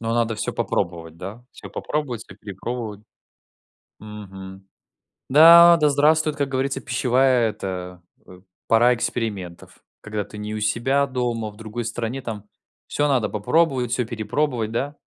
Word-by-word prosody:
Но 115 0 -2
надо 115 -1 +1
всё 105 - -3
попробовать, 85 -2 -3
да, 105 +8 -9
всё - - -11
попробовать, 130 -7 -3
всё 95 - -14
перепробовать. 105 +1 -6 1.0
Мгм. 95 -2 -10 0.6
Да, 170 +4 +9
да 150 -1 +4
здравствует, 155 +1 +2
как 140 -1 -1
говорится, 135 0 -2
пищевая 125 -1 +2
эта, 90 -3 -6 0.2
э, 90 0 -14 0.3
пора 120 +2 +5
экспериментов. 100 -7 -4 0.2
Когда 105 -1 -4
ты 105 - -12
не 105 +1 -5
у 105 - -4
себя 130 +6 +1
дома, 120 -4 -2
а - - -12
в 105 - -19
другой 110 +2 -6
стране, 120 +3 -4
там 105 -4 -6 0.4
всё 145 0 0
надо 125 -5 +1
попробовать, 130 +2 +1
всё 125 -1 0
перепробовать, 115 +1 -2
да? 140 +5 -3
115 Hz, 145 wpm, -22 LUFS, 105-135 Hz, 1.0 s, Да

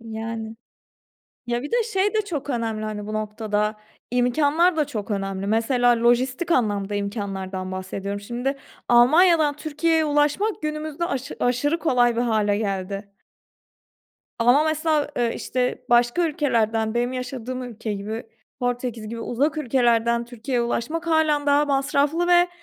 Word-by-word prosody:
Yani, 225 0 -6 0.9
ya, 240 0 -1
bir 290 - -6
de 475 0 +2
şey 415 -2 0
de 435 - +2
çok 325 -9 -5
önemli, 225 -4 -2
hani, 210 -1 -5
bu 215 - -5
noktada, 215 0 -1 0.4
imkânlar 290 +8 +3
da 305 -2 +1
çok 215 -4 -5
önemli. 195 -1 -3
Mesela, 235 +2 +2
lojistik 255 +8 +2
anlamda 205 -7 +1
imkânlardan 195 -2 -4
bahsediyorum. 190 +2 -4
Şimdi 245 +6 -3 0.3
Almanya'dan 305 +5 +5
Türkiye'ye 315 +2 0
ulaşmak 295 +8 +1
günümüzde 305 +1 -3
aşı 275 -5 -4
aşırı 270 +7 +1
kolay 245 -7 +2
bir 235 - +1
hâle 215 -4 +1
geldi. 200 -1 -4 1.3
Ama, 245 +6 +4
mesela, 310 -1 +1
ııı, 235 -1 +1
işte, 250 0 -2
başka 240 +8 +4
ülkelerden, 225 -7 0
benim 245 +1 0
yaşadığım 255 0 -5
ülke 230 -3 -5
gibi 210 +3 -4 0.4
Portekiz 245 -3 -3
gibi 230 +1 -6
uzak 285 +7 0
ülkelerden 235 -3 +2
Türkiye'ye 240 +1 -2
ulaşmak 310 +8 -2
hâlen 310 -3 +2
daha 285 +1 +4
masraflı 285 +4 +1
ve, 350 0 +5
245 Hz, 135 wpm, -23 LUFS, 220-295 Hz, 1.3 s, Almanya'dan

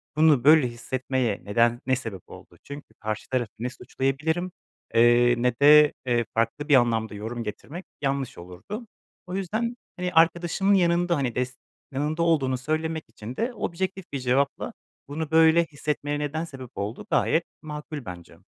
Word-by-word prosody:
"Bunu 155 -5 +4
böyle 150 -3 +6
hissetmeye 125 -1 -2
neden 115 +3 +2
ne 130 - +3
sebep 110 -8 -6
oldu?" - - -13
Çünkü 145 +1 -10
karşı 110 0 -4
tarafı 120 -5 -1
ne 125 - -2
suçlayabilirim, 155 +8 -2 0.4
eee, 120 +1 +5
ne 125 0 +1
de, 150 +1 +8
eee, 120 -2 +1
farklı 115 +6 0
bir 145 - +7
anlamda 115 -4 +2
yorum 115 +3 -5
getirmek 145 - -7 0.2
yanlış 135 -2 -2
olurdu. 90 - -8 0.4
O 180 - -4
yüzden, 220 +5 -2 0.2
hani, 180 0 -3
arkadaşımın 170 +4 +3
yanında, 175 -1 +3
hani, 130 -5 -1
des 125 0 -2 0.3
yanında 150 +5 -1
olduğunu 135 -6 +2
söylemek 155 +4 -2
için 115 +2 -9
de 245 +2 -1
objektif 190 -2 -3
bir 140 - -1
cevapla, 130 +2 0 0.3
"Bunu 155 +2 -4
böyle 160 +1 +6
hissetmeye 145 -1 -3
neden 150 +2 -2
sebep 130 -5 -10
oldu?" 105 +4 -5
gayet 165 - +2 0.2
makul 150 -3 -7
bence. 90 -2 -10
140 Hz, 150 wpm, -25 LUFS, 120-160 Hz, 0.4 s, de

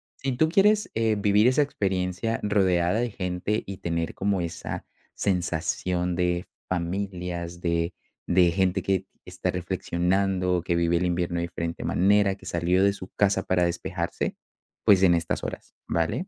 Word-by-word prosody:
si 135 -1 -2
tú 155 +6 +2
quieres, 210 +4 +4
eh, 110 -1 +2
vivir 105 +3 +4
esa 130 +3 +4
experiencia 95 -3 -1
rodeada 95 -1 +2
de 120 -2 -1
gente 90 +3 -2
y 95 - -6
tener 85 -2 -2
como 100 -1 0
esa 85 -1 -5 0.3
sensación 90 -1 -1
de 90 0 0 0.2
familias 90 -1 -3
de 85 0 0 0.4
de 90 -1 +5
gente 95 +1 +1
que 95 -1 0 0.2
está - - -3
reflexionando, 90 0 0
que 85 - 0
vive 85 0 +2
el 90 - 0
invierno 85 0 -1
de 85 - 0
diferente 85 -1 -4
manera, 100 +1 +3
que 95 - -17
salió 90 +1 +1
de 100 0 +4
su 95 -2 -9
casa 95 -1 +2
para 90 -1 +1
despejarse, 85 0 -2 0.5
pues, 95 -2 +6
en 90 -2 +6
estas 85 -1 -2
horas, - - -7
¿vale? 85 - -1
90 Hz, 155 wpm, -26 LUFS, 85-100 Hz, 0.5 s, pues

